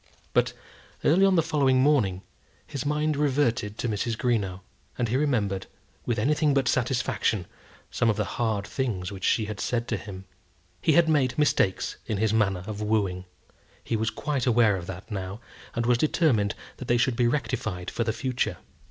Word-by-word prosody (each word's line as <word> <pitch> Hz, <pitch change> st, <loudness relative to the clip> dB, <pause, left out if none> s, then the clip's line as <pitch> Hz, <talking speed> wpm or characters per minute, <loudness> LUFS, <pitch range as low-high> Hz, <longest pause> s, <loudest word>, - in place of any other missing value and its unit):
But -, -, +2 dB, 0.5 s
early 175 Hz, +6 st, +4 dB
on 190 Hz, -, +3 dB
the 165 Hz, -, +4 dB
following 140 Hz, -5 st, +2 dB
morning 120 Hz, -10 st, +2 dB, 0.4 s
his 145 Hz, -1 st, -4 dB
mind 150 Hz, +1 st, +1 dB
reverted 130 Hz, -7 st, +1 dB
to -, -, -2 dB
Mrs. 110 Hz, +1 st, -1 dB
Greenow, 100 Hz, -7 st, 0 dB, 0.4 s
and 120 Hz, -2 st, 0 dB
he 120 Hz, -, 0 dB
remembered, 110 Hz, -9 st, 0 dB, 0.4 s
with 120 Hz, -, 0 dB
anything 150 Hz, +5 st, +2 dB
but 135 Hz, -3 st, +2 dB
satisfaction, 120 Hz, -6 st, 0 dB, 0.5 s
some 115 Hz, -, +1 dB
of 110 Hz, -, +2 dB
the 105 Hz, -, 0 dB, 0.2 s
hard 110 Hz, -4 st, 0 dB
things 105 Hz, -7 st, -2 dB
which 95 Hz, -2 st, -8 dB
she 110 Hz, -, +2 dB
had 105 Hz, -1 st, -6 dB
said 120 Hz, -1 st, -1 dB
to -, -, 0 dB
him. 95 Hz, -2 st, -9 dB, 0.6 s
He 160 Hz, -, +3 dB
had 170 Hz, 0 st, +5 dB
made 145 Hz, -5 st, +2 dB
mistakes 145 Hz, -10 st, +1 dB
in 105 Hz, -, -1 dB
his 110 Hz, +1 st, +1 dB
manner 100 Hz, -5 st, +1 dB
of 105 Hz, 0 st, -5 dB
wooing. 100 Hz, -4 st, 0 dB, 0.6 s
He -, -, -1 dB
was 110 Hz, 0 st, 0 dB
quite 140 Hz, -2 st, -2 dB
aware 115 Hz, -4 st, +4 dB
of 90 Hz, -2 st, -6 dB
that 95 Hz, +3 st, -8 dB
now, 95 Hz, 0 st, -4 dB, 0.4 s
and 115 Hz, -1 st, 0 dB
was 120 Hz, 0 st, +3 dB
determined 125 Hz, -, +2 dB, 0.2 s
that 130 Hz, -, -8 dB
they 120 Hz, -, +3 dB
should 120 Hz, +1 st, +2 dB
be 120 Hz, 0 st, +3 dB
rectified 110 Hz, -8 st, -2 dB
for 115 Hz, -, -1 dB
the 110 Hz, -, 0 dB
future. 125 Hz, +2 st, -2 dB
115 Hz, 180 wpm, -26 LUFS, 105-135 Hz, 0.6 s, had